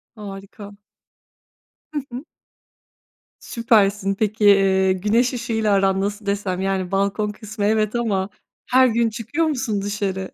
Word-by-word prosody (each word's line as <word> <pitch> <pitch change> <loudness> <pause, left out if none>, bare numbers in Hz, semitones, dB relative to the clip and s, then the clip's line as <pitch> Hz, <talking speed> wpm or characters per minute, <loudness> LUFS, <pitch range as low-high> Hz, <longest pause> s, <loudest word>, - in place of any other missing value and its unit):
Harika. 200 0 -10 1.2
Hı 295 - -1
hı. 250 +4 -6 1.2
Süpersin. 205 -4 +1
Peki, 215 +1 -1
eee, 190 -1 +4
güneş 225 +7 +1
ışığıyla 225 -3 0
aran 195 -1 +2
nasıl 205 +1 -3
desem? 200 -2 -2
Yani, 190 -1 -2
balkon 200 +2 0
kısmı 210 0 -5
evet 215 +1 +1
ama 205 -5 -1 0.4
her 255 0 +6
gün 230 0 +1
çıkıyor 235 +9 -2
musun 245 -8 -1
dışarı? 200 -2 -3
205 Hz, 120 wpm, -21 LUFS, 195-225 Hz, 1.2 s, her